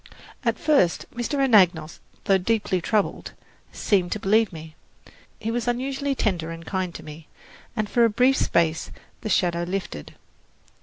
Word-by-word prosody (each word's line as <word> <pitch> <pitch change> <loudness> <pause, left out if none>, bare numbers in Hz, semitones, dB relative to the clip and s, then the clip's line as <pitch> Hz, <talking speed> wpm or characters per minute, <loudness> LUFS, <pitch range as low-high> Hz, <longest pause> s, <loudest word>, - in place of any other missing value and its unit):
At - - +1
first 295 - +2
Mr. 240 +4 -2
Anagnos, 185 - +3 0.2
though 195 -1 +3
deeply 200 -2 0
troubled, 210 +3 -1 0.4
seemed 185 -4 0
to 215 - -4
believe 215 +2 +2
me. 160 -2 -10 0.7
He 225 - -3
was 240 0 -2
unusually 270 +3 -1
tender 175 -9 -1
and 165 0 -8
kind 185 -1 -2
to - - -8
me, 155 +1 -11 0.5
and 215 -2 -1
for 235 +3 +2
a 230 - +5
brief 250 +5 +3
space 165 -1 +1 0.3
the 220 - -4
shadow 175 -3 +1
lifted. 175 - -5
200 Hz, 150 wpm, -24 LUFS, 170-235 Hz, 0.7 s, a